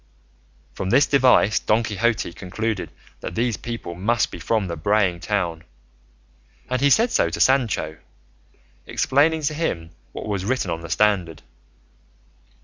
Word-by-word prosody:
From 95 - -4
this 140 - +5
device 125 -6 +4
Don 110 +1 +1
Quixote 110 -4 -1
concluded 100 +4 -3 0.3
that - - -6
these 120 0 0
people 115 -7 -6
must 105 +7 0
be - - -8
from 110 -3 0
the 85 -2 -4
braying 95 +1 +1
town, 85 -4 -2 1.1
and 130 0 0
he 140 - +4
said 230 - +4
so - - +2
to - - -5
Sancho, 115 - +2 0.9
explaining 155 +3 +2
to 150 - 0
him 85 - -3 0.2
what - - -7
was 100 -3 -2
written 115 -4 -1
on 80 0 -3
the 85 - -9
standard. 90 -5 +1
105 Hz, 140 wpm, -22 LUFS, 90-125 Hz, 1.1 s, this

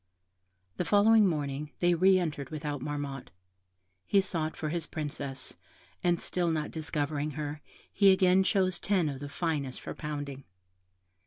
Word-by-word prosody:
The - - 0
following 210 +2 +5
morning, 145 -3 -3
they 175 0 +3
re 185 +3 +5
entered 150 -7 -3
without 150 -3 -4
Marmotte; 145 -2 -4 0.8
he 200 - +4
sought 165 -5 -1
for 155 - -3
his 165 0 0
Princess, 140 -3 -1 0.5
and 175 -1 +2
still 175 -2 0
not 155 -2 -1
discovering 150 -1 -2
her, 150 0 -4 0.3
he 200 -1 +6
again 190 0 +4
chose 185 -2 +1
ten 190 -5 +1
of 135 -2 -5
the 145 0 -6
finest 145 -5 -2
for - - -6
pounding. 145 -3 -5
155 Hz, 145 wpm, -30 LUFS, 145-180 Hz, 0.8 s, he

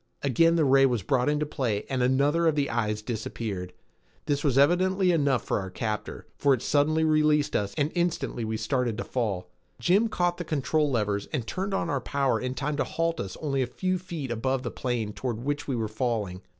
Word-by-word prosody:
Again 165 +5 +4
the 160 -3 +3
ray 135 0 +6
was 120 -6 -1
brought 125 +5 +1
into 150 0 +1
play 120 -8 -2
and 130 -2 -1
another 140 +6 +3
of 160 - +3
the 140 -3 0
eyes 105 -2 -1
disappeared. 105 -5 -4 0.5
This 145 -1 0
was 135 -4 +2
evidently 185 +5 +4
enough 140 -7 +2
for - - 0
our 95 -1 -5
captor, 105 +3 -4
for 140 -2 +4
it 120 - -8
suddenly 155 +2 +2
released 150 -1 +3
us 100 -1 -1
and 150 +1 +1
instantly 170 -8 -1
we 110 0 -2
started 115 0 -1
to - - -2
fall. 100 -8 -2 0.3
Jim 200 +6 +3
caught 175 -4 0
the 175 - -4
control 150 -1 0
levers 105 -5 -1
and 135 -8 -2
turned 195 - -2
on 180 - -1
our 140 -5 -1
power 140 0 0
in 125 0 -3
time 145 +1 -2
to - - +2
halt 165 0 -1
us 95 -2 -5
only 135 -3 0
a 125 - 0
few 185 +8 -1
feet 165 -8 -5
above 130 +3 -1
the - - -3
plain 120 -5 -2
toward 120 -2 -3
which 145 +1 -2
we 135 - -1
were 110 -2 -1
falling. 110 -5 -2
135 Hz, 210 wpm, -27 LUFS, 115-155 Hz, 0.5 s, ray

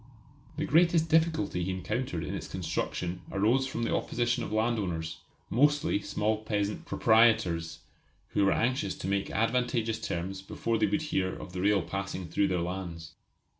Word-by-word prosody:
The 155 - 0
greatest 165 0 +4
difficulty 160 - +2
he 90 - -2
encountered 95 -1 -2
in - - -4
its - - -5
construction 90 0 -3
arose 115 +7 +2
from 120 -3 -3
the - - +1
opposition 120 +1 0
of - - -5
landowners, 95 -8 -1 0.3
mostly 145 -4 +3
small 105 +2 0
peasant 105 -1 -2
proprietors, 95 -8 +3 0.5
who 100 - +1
were 100 - +4
anxious 120 -4 0
to - - -5
make 100 0 0
advantageous 115 0 0
terms 95 +3 -3
before 115 +3 -2
they 105 - +3
would 105 +11 0
hear 95 -11 0
of 90 - -9
the 90 - -3
rail 100 -1 +3
passing 95 -1 -4
through 100 +4 +2
their 90 -2 0
lands. 85 -3 -5
105 Hz, 160 wpm, -29 LUFS, 95-120 Hz, 0.5 s, greatest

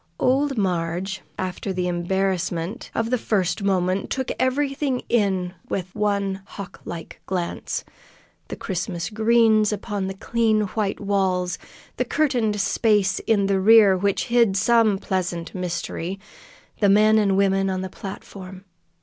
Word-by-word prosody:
Old 270 +1 +2
Marg, 180 -1 -1 0.3
after 185 +1 -3
the 180 -1 -1
embarrassment 180 +2 -1
of 230 +1 -1
the 250 - +2
first 190 -4 0
moment, 190 -1 0
took 260 -1 -2
everything 270 0 0
in 190 -6 +1 0.2
with 185 -1 -3
one 200 -2 -1
hawk 195 -2 -10
like 165 -2 -8
glance 180 -2 -3 0.6
the - - -5
Christmas 180 0 -4
greens 220 -1 +4
upon 205 -2 -3
the 190 - -5
clean, 220 +1 +1
white 205 -2 -2
walls, 190 -3 0 0.4
the - - 0
curtained 240 -9 +1
space 205 -1 +2
in 205 -3 +3
the 195 -1 +1
rear 205 -1 +7
which 200 +1 0
hid 230 -5 +4
some 225 0 +4
pleasant 180 -3 -3
mystery, 180 0 -4 0.6
the 205 - +4
men 215 +2 +5
and 195 -2 +2
women 195 0 +2
on 185 -1 -2
the 190 - -3
platform. 190 0 -9
195 Hz, 135 wpm, -23 LUFS, 185-220 Hz, 0.6 s, rear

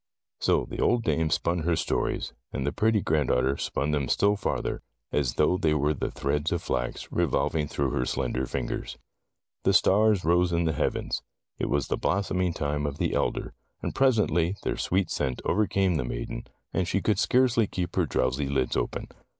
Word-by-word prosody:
So - - +2
the - - -7
old 120 -1 +3
dame 80 -5 +1
spun 85 +3 +1
her 85 +1 +1
stories, - - -1 0.2
and 65 - -3
the 75 - +1
pretty 110 +4 +2
grand 75 -7 +1
daughter 65 +2 +2
spun 75 - -1
them 70 -3 0
still 100 +10 +3
farther, 100 - -2 0.3
as 70 -5 0
though 85 +4 +3
they 80 -5 +2
were 75 +1 +2
the - - -3
threads 75 +3 -1
of 85 - -1
flax - - -3
revolving 75 -2 +1
through 70 -2 -1
her 60 - 0
slender 65 +1 -1
fingers. 65 -2 -4 0.6
The 95 - +2
stars 100 +1 +4
rose 85 +1 +3
in 85 0 +1
the 80 -1 +1
heavens. - - -1 0.4
It - - -1
was 70 -2 +1
the - - -1
blossoming 90 -2 0
time 75 -1 -1
of 70 0 -4
the - - 0
elder, - - -1 0.3
and - - -2
presently 100 - +2
their - - -1
sweet 95 -2 0
scent 65 -4 -1
overcame 95 -3 +2
the 75 - -1
maiden, - - -5 0.3
and 90 - 0
she 100 - +1
could 105 -3 +2
scarcely 120 -2 +3
keep 90 -2 -4
her - - +2
drowsy 65 +3 0
lids 70 -2 0
open. - - -2
80 Hz, 185 wpm, -27 LUFS, 70-95 Hz, 0.6 s, stars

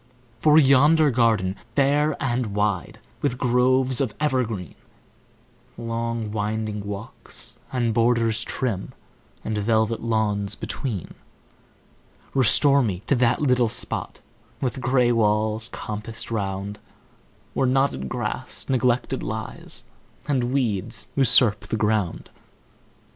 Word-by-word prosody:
For 150 +4 +5
yonder 145 +2 +5
garden, 110 -6 +2 0.2
fair 145 +2 +2
and 120 -6 -1
wide, 105 -3 -1 0.2
With 130 -4 0
groves 130 +1 +2
of 130 -6 -2
evergreen, 125 - -1 1.0
Long 115 -1 -3
winding 105 0 -2
walks, 100 +1 -9 0.2
and 120 -3 0
borders 115 -1 +2
trim, 110 -8 -3 0.5
And 110 - -3
velvet 110 +1 +1
lawns 105 -3 0
between; 110 -10 -5 1.2
Restore 135 +3 +5
to 120 - +1
me 95 -1 -4
that 125 +1 +2
little 125 -4 +3
spot, - - -4 0.4
With 130 0 -3
gray 125 -1 +3
walls 110 0 +1
compassed 110 +2 -6
round, 100 -1 -3 0.7
Where 130 - +1
knotted 130 - +1
grass - - -4
neglected 130 0 +1
lies, 110 +1 -6 0.4
And 135 -4 +1
weeds 115 -5 -1
usurp 125 -5 +4
the 110 - -2
ground. 105 -4 -1
115 Hz, 105 wpm, -24 LUFS, 105-130 Hz, 1.2 s, For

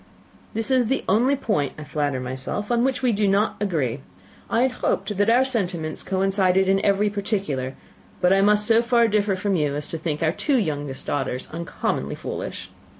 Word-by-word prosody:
"This 225 +3 -2
is 255 -3 +3
the 265 +3 0
only 240 +8 +3
point, 205 - -1
I 150 - -7
flatter 145 -3 -2
myself, 130 - -4
on 240 0 +2
which 265 0 0
we 250 - +3
do 210 -1 +1
not 200 +3 +2
agree. 145 - -1 0.5
I 230 - +2
had 260 - +2
hoped 210 - 0
that 205 +3 +2
our 250 +3 +5
sentiments 180 -11 -2
coincided 190 0 +2
in 195 +1 +2
every 200 +1 +3
particular, 195 - -2 0.4
but 180 +1 +4
I 195 - +4
must 210 +1 +4
so 225 +1 +5
far 235 -1 +3
differ 205 -2 +1
from 195 +1 -1
you 150 -4 0
as 150 0 -3
to 165 - -4
think 155 -1 -2
our 160 - +3
two 275 - 0
youngest 145 - -2
daughters 130 -3 -2
uncommonly 170 +2 -3
foolish." - - -6
195 Hz, 190 wpm, -23 LUFS, 155-220 Hz, 0.5 s, our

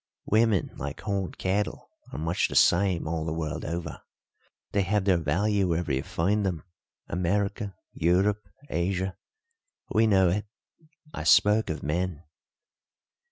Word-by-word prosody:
"Women, 110 -3 +2
like 70 +2 -5
horned 100 -2 -3
cattle, 100 +3 -2 0.2
are - - -6
much 80 +3 0
the - - -7
same 90 -2 +4
all 80 0 -2
the 80 - -3
world 80 -2 -3
over. 85 +2 -5 0.7
They 100 - +2
have 100 +1 0
their 95 -3 +4
value 95 +6 +1
wherever 85 -4 0
you 65 - +1
find 100 +9 0
them 90 -6 -2 0.4
America, 100 +3 -1 0.2
Europe, 100 +4 +1 0.2
Asia. 95 0 -1 0.8
We 110 +1 +4
know 95 -4 +4
it. 105 +4 -1 0.7
I - - -5
spoke 105 +2 +5
of 80 - -4
men." 85 +1 -2
95 Hz, 135 wpm, -27 LUFS, 85-100 Hz, 0.8 s, spoke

